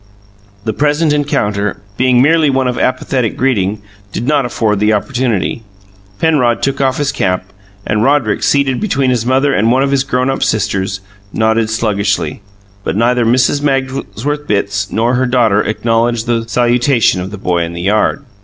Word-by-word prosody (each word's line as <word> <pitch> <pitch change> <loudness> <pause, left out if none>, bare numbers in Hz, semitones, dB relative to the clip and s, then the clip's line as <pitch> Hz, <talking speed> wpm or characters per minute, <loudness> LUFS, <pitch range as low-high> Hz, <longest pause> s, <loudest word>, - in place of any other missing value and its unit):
The 110 - -2
present 150 +1 +1
encounter, 105 -9 -1 0.2
being 125 +1 +3
merely 155 0 +3
one 135 -1 +1
of 125 - -2
apathetic 130 -2 -1
greeting, 105 -5 0 0.3
did 120 - -4
not 145 -4 +2
afford 110 -4 0
the 105 +1 +2
opportunity. 120 -1 -1 0.6
Penrod 135 -8 +1
took 135 0 0
off 130 -1 +1
his 145 -2 0
cap, 90 0 -2 0.3
and 105 0 0
Roderick, 135 -4 +1
seated 140 -2 +1
between 140 -11 +1
his 120 -2 -1
mother 135 +2 +2
and 115 0 +2
one 130 +2 +3
of 140 - 0
his 135 -1 +2
grown 130 0 0
up 135 - -4
sisters, 95 -3 -1 0.3
nodded 110 0 +1
sluggishly, 100 -7 -1 0.4
but - - -2
neither 120 +2 +2
Mrs. 130 +4 +2
Magsworth 135 +1 -2
Bitts 100 -1 -1
nor 115 +2 +1
her 130 0 +1
daughter 115 -5 +2
acknowledged 115 +2 0
the 115 -1 -1
salutation 120 -4 +2
of 95 - -5
the 105 - -8
boy 90 -2 -1
in 85 0 -3
the 85 - -6
yard. 105 +8 +1
120 Hz, 165 wpm, -14 LUFS, 105-135 Hz, 0.6 s, being